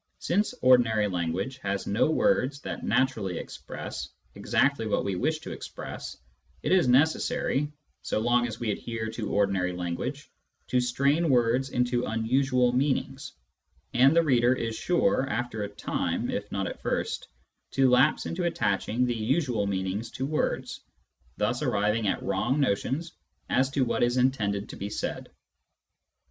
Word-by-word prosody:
Since 205 +8 0
ordinary 115 -4 +5
language 90 +7 -2
has 100 -3 -2
no 105 +9 +2
words 150 - +2
that - - -6
naturally 110 -9 0
express 65 0 -7 0.2
exactly 135 -5 +1
what 105 - 0
we 100 -2 -1
wish 155 - 0
to - - -7
express, - - -7 0.5
it - - -1
is 185 -7 +4
necessary, 145 +1 +2 0.3
so - - -2
long 120 +2 +2
as 115 -1 -7
we 115 -3 -1
adhere 110 +1 -4
to 110 -2 -4
ordinary 95 -3 +1
language, 90 +11 -4 0.4
to 125 - +3
strain 140 +6 +2
words 125 +1 +2
into 125 -1 0
unusual 125 +2 +2
meanings; 135 0 -1 0.6
and 135 +5 +5
the 170 - +5
reader 125 -4 +3
is 115 -2 -3
sure, 175 - +1
after 120 -3 -2
a 100 - -3
time 105 - -2
if - - -4
not - - -1
at - - -6
first, - - -2 0.5
to 135 -1 +4
lapse 125 +4 +4
into 175 +1 -2
attaching 110 -4 0
the 120 - 0
usual 115 -1 0
meanings 95 +3 -2
to 130 - -4
words, 150 +2 -2 0.6
thus - - 0
arriving 105 +2 +1
at - - -1
wrong 120 +9 0
notions 140 +6 0 0.4
as 130 +1 +3
to 135 -1 +1
what - - -1
is 120 +1 +2
intended 105 -6 +1
to - - -7
be 100 - -4
said. - - -4
125 Hz, 150 wpm, -27 LUFS, 105-135 Hz, 0.6 s, ordinary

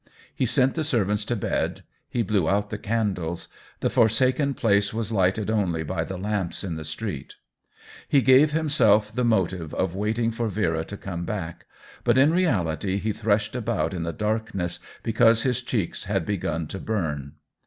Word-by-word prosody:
He 130 - 0
sent 130 +3 +2
the 160 - -1
servants 105 -8 +1
to 120 - -1
bed, 100 - -2 0.3
he 120 - 0
blew 100 -5 +1
out 100 +1 0
the 105 - -4
candles; 100 -7 -2 0.3
the - - +2
forsaken 130 +4 +3
place 100 -3 +2
was 115 -1 -2
lighted 100 +1 +1
only 90 -7 0
by 80 +1 -2
the 95 +3 -6
lamps 100 -2 -2
in 90 -4 -3
the 80 - -6
street. 75 -1 -5 0.7
He 140 -2 +4
gave 135 +4 +6
himself 110 -10 +3
the 125 +2 0
motive 95 -8 0
of 95 -2 0
waiting 110 +4 0
for 115 0 -2
Vera 85 -6 0
to 100 - -8
come 85 -3 -5
back, 85 -4 -5 0.4
but 120 0 +3
in 145 +5 +5
reality 100 - +1
he 105 +2 -1
threshed 105 +1 0
about 110 -9 -1
in 90 - -3
the 85 0 -2
darkness 105 -3 -2 0.2
because 115 0 +4
his 130 -1 0
cheeks 115 -7 -2
had - - -1
begun 85 -4 -2
to 95 - -5
burn. 75 -11 -3
105 Hz, 175 wpm, -25 LUFS, 90-115 Hz, 0.7 s, gave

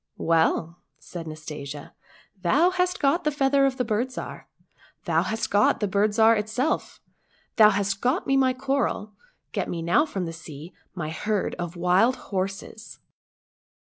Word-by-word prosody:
" - - -51 0.2
Well,"lsaidjNastasia, 155 -3 -3 0.2
" 190 - -29
thou 300 - +3
hast 360 0 0
got 290 +5 +2
the 305 - +2
feather 275 -1 +3
of 260 -1 -3
the 250 - 0
Bird 225 +3 0
Zhar, - - -7 0.6
thou - - +2
hast 225 +1 -3
got 205 +2 +3
the 210 - 0
Bird 200 +2 +2
Zhar 225 0 +6
itself, 220 +8 -2 0.6
thou 215 -2 +8
hast 195 -1 -1
got 260 +9 +1
me 270 - +2
my 265 -1 +4
coral, 265 -5 -1 0.4
get - - -2
me 170 -1 -4
now 180 - +3
from 195 -10 -3
the 165 - -5
sea 160 +1 -10 0.2
my 155 -4 -4
herd 210 +4 -1
of 175 0 -4
wild 180 +8 +3 0.2
horses 195 +3 -4
210 Hz, 155 wpm, -25 LUFS, 175-260 Hz, 0.6 s, thou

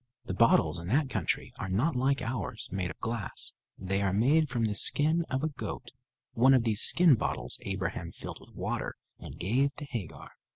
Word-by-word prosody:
The - - -4
bottles 90 -6 +3
in 85 - -8
that 135 +5 +1
country 95 -7 -2
are 95 - -4
not 125 - 0
like 135 +2 +1
ours, 115 -6 -4
made 95 -1 -2
of - - -9
glass. 115 -2 -4 0.2
They 95 +1 -2
are 100 -1 +1
made 140 +10 +3
from 120 -2 0
the 105 - -1
skin 155 +9 +2
of 130 +2 -2
a 155 - +1
goat. 130 -3 -7 0.4
One 130 +3 +5
of 125 - +3
these 110 -2 +5
skin 175 -4 +7
bottles 120 - -2
Abraham 95 -3 -4
filled - - -9
with - - -18
water - - -3 0.2
and - - -10
gave 130 +9 0
to 150 - -7
Hagar. 115 - -7
115 Hz, 195 wpm, -29 LUFS, 95-135 Hz, 0.4 s, skin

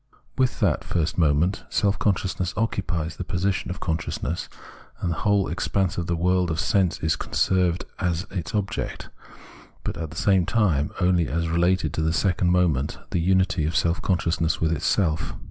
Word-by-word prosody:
With 130 -1 +1
that 90 -9 +2
first 85 0 -1
moment, 80 +5 +2
self 100 0 +1
consciousness 95 -3 0
occupies 85 -7 -1
the - - -3
position 95 +1 -1
of 90 +2 -5
consciousness, 85 -1 -3 0.5
and 85 - -1
the 80 - -2
whole 100 -4 +2
expanse 95 +2 -1
of 85 -2 -3
the 85 - 0
world 90 +1 +2
of 80 0 -2
sense 90 +5 +2
is 80 -1 +1
conserved 90 -2 +1
as 90 0 -1
its 90 -3 -4
object, 100 -2 -3 0.7
but - - -3
at 80 -2 -4
the 80 - -10
same 95 -3 +3
time 85 -11 +2
only 90 -3 +3
as 85 +1 -1
related 85 -1 +1
to 80 - -1
the 80 0 +1
second 90 0 +1
moment, 85 -6 +1
the - - +1
unity 95 -1 +2
of 80 +2 -1
self 85 0 +1
consciousness 85 -3 0
with 80 -1 +1
itself. 80 +1 0
90 Hz, 170 wpm, -24 LUFS, 80-95 Hz, 0.7 s, same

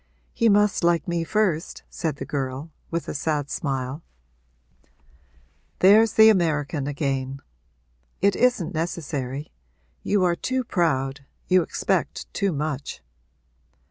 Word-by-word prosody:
'He 230 -2 +3
must 205 -2 +3
like 170 -1 +2
me 170 -1 -1
first,' 185 -3 -1
said 160 -5 -3
the - - -6
girl, 135 +2 -4 0.2
with 170 0 -3
a - - -3
sad 150 -1 -2
smile. 135 +1 -3 1.8
'There's 210 +3 +6
the 220 0 +8
American 150 -7 +1
again! 135 -2 -2 0.8
It 200 0 +3
isn't 245 -9 +1
necessary. 150 -4 -4 0.5
You 200 -2 +1
are 175 -1 +2
too 255 +7 -2
proud 140 - 0 0.2
you 185 0 +5
expect - - -2
too 200 -1 0
much.' 150 -2 -4
165 Hz, 115 wpm, -24 LUFS, 140-190 Hz, 1.8 s, the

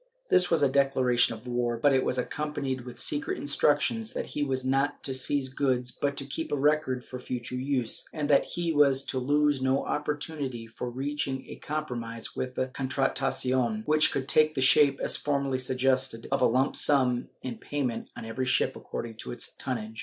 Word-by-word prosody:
This 180 -1 +5
was 165 -4 +2
a - - +6
declaration 130 -3 +2
of 110 - -14
war, 120 -1 -1
but 140 +4 +3
it 130 - +3
was 125 - 0
accompanied 135 -2 -3
with 120 -1 -9
secret 145 0 0
instructions 150 +10 +1
that - - -3
he 150 - -5
was 130 -2 -1
not 135 +2 0
to 135 - -1
seize 130 +1 +1
goods 130 -2 0
but 140 +2 -2
to 140 - +2
keep 160 +4 -4
a - - +2
record 145 -3 +1
for 130 - -8
future 125 -1 -5
use, 125 -2 -1
and 150 -2 -3
that 145 -2 +4
he 170 -1 -2
was 140 -2 +4
to 130 - -2
lose 145 +1 +2
no 130 +1 +1
opportunity 145 -5 -3
of 115 - -22 0.2
reaching 135 -1 -2
a - - -9
compromise 120 -7 -5
with 130 0 -4
the 130 - -1
Contratacion, 130 -3 0
which 155 +1 +4
could 135 -1 -3
take 155 +2 +3
the - - -1
shape, 135 +1 +5
as - - 0
formerly 140 -2 -1
suggested, 130 -2 0
of 135 - +1
a 125 - +6
lump 130 +4 +1
sum 130 -4 +3 0.2
in 125 -3 -5
payment 130 -6 -3
on - - -7
every 125 +3 -3
ship 125 - +2
according 115 -1 -7
to - - -7
its 120 - -2
tonnage. 110 -4 -4
135 Hz, 190 wpm, -28 LUFS, 125-145 Hz, 0.2 s, a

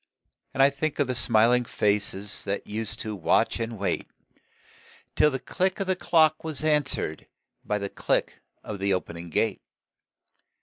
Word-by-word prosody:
And 135 - +5
I 140 - +6
think 145 +2 -2
of 145 - +2
the 130 - -2
smiling 120 +1 +3
faces 105 -2 0
That 100 0 -2
used 110 +1 -4
to 110 -1 -4
watch 90 +4 +2
and 115 -1 -3
wait, 100 - -2 1.1
Till 150 - +5
the 135 - -2
click 185 +8 -1
of 195 - 0
the 185 0 +1
clock 160 -3 +3
was 155 -2 -4
answered 150 - 0 0.4
By 105 - -1
the 100 -1 -3
click - - -1 0.2
of 105 -2 -6
the 100 0 +2
opening 85 -1 -6
gate. 105 +5 0
115 Hz, 160 wpm, -26 LUFS, 100-150 Hz, 1.1 s, I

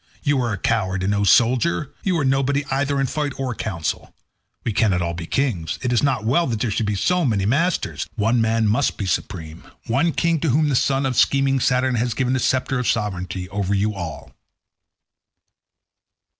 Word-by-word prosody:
You 145 -3 +2
are 120 -2 -1
a 100 - -2
coward 95 -2 -1
and 95 - +1
no 100 0 +1
soldier; 125 +8 +3
you 185 -3 0
are 145 - 0
nobody 135 +2 +1
either 140 +1 0
in 135 - +2
fight 145 +1 -2
or 130 -2 -2
council; 90 -8 -4 0.5
we 115 - -2
cannot 100 -4 +2
all 85 0 -2
be 85 -1 -6
kings; 100 - -1
it 125 -1 0
is 120 - +3
not 130 -6 0
well 165 +9 +2
that 115 -4 -2
there 115 0 -1
should 110 +1 -1
be 105 -1 -1 0.3
many 100 -5 0
masters; 160 - 0
one 115 +2 +2
man 110 0 +1
must 120 +7 +1
be 100 - -3
supreme—one 95 - -3
king 170 -1 +1
to 160 - 0
whom 150 +4 +2
the 140 - +1
son 135 +2 +1
of 130 -1 -1
scheming 135 +2 +3
Saturn 130 +1 +1
has 120 -1 -1
given 130 0 0
the 130 - +1
sceptre 130 +1 0
of 125 - -2
sovereignty 95 -3 -2
over 100 0 -1
you 105 +2 0
all." 85 -5 -7
120 Hz, 190 wpm, -21 LUFS, 100-135 Hz, 0.5 s, soldier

